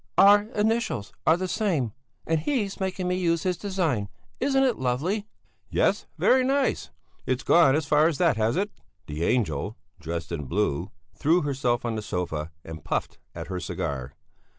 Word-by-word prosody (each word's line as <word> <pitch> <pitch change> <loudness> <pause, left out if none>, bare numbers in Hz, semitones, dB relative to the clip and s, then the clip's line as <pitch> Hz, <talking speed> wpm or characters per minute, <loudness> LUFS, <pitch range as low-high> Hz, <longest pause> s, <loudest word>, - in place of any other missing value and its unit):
"Our 205 +1 +7
initials 220 - 0
are 160 +2 +6
the 185 +1 -2
same 160 - 0 0.3
and 160 -1 +1
he's 205 - -1
making 190 -1 -2
me 180 - +1
use 170 -3 +1
his 185 -1 +1
design. 165 - -1 0.3
Isn't 270 0 +2
it 255 -4 +1
lovely?" 160 - -1 0.4
"Yes, - - +1
very 260 0 +4
nice. 270 +1 +1 0.4
It's 130 +2 0
gone 160 -6 +5
as 155 -1 0
far 150 +2 +4
as 165 -4 -1
that, 170 -7 +3
has 110 +3 +1
it?" 205 +2 0 0.3
The 75 +2 -4
angel, 100 - 0 0.2
dressed 85 +1 -5
in 75 -4 -3
blue, 85 0 -1 0.2
threw 165 +4 +2
herself 130 -4 0
on 120 - -1
the 110 - -3
sofa 85 -6 -3 0.2
and 80 -2 -8
puffed - - -2 0.2
at - - -5
her 95 -1 -4
cigar. 70 -6 -4
150 Hz, 170 wpm, -26 LUFS, -, 0.4 s, Our